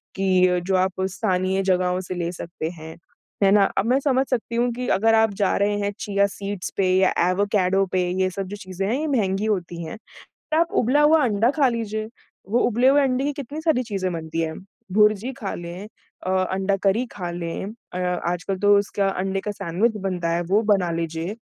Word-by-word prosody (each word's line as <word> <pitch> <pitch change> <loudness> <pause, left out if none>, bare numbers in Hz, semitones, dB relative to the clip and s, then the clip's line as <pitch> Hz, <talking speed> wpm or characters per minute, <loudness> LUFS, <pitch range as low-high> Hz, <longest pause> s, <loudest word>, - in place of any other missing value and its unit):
कि 185 -2 +3
जो 190 - +2
आप 190 0 0
स्थानीय 185 -1 0
जगहों 180 0 +1
से 185 0 -6
ले 175 -1 -2
सकते 170 -2 -5
हैं। 160 -1 -10 0.5
है 195 - +5
ना? 205 -1 +6
अब 195 - +2
मैं 255 +3 +3
समझ 265 -1 +1
सकती 235 -2 -2
हूँ 240 +1 +1
कि 250 +1 -4
अगर 225 +3 +3
आप 220 -2 +3
जा 195 - +2
रहे 205 +1 +1
हैं 205 0 -1
चिया 200 -1 +1
सीड्स 200 -1 -5
पे 195 - +2
या 190 0 +3 0.2
एवाकाडो 195 0 +2
पे 185 - +2 0.2
ये 185 - +2
सब 195 +1 -4
जो 205 - -6
चीज़ें 190 -1 -4
हैं 245 +7 0
ये 315 - -2
महँगी 210 -7 0
होती 175 -5 -2
हैं, 160 - -7 0.6
आप 335 +1 +1
उबला 260 +5 +3
हुआ 300 0 +5
अंडा 225 +1 +2
खा 280 -3 +5
लीजिए। 220 -2 -3 0.4
वो 240 +3 +2
उबले 245 +2 +2
हुए 285 +1 +5
अंडे 265 -1 +1
की 290 - -1
कितनी 285 +2 -6
सारी 315 -6 +2
चीज़ें 195 -5 -2
बनती 165 0 -3
हैं, 160 -1 -2 0.4
भुर्जी 215 +4 +3
खा 195 - -3
लें 175 +4 -7 0.4
अ, - - 0 0.2
अंडा 195 +1 0
करी 205 +5 +2
खा 180 -3 -5
लें 170 +1 -4 0.3
अ, 180 - -3
आजकल 180 +1 -2
तो 205 0 +5
उसका 200 0 0
अंडे 195 +1 -2
का 210 - -3
सैंडविच 205 +5 -1
बनता 180 -3 -1
है 170 - 0
वो 210 - +4
बना 180 -3 0
लीजिए। 165 +3 -3
195 Hz, 205 wpm, -23 LUFS, 180-225 Hz, 0.6 s, ना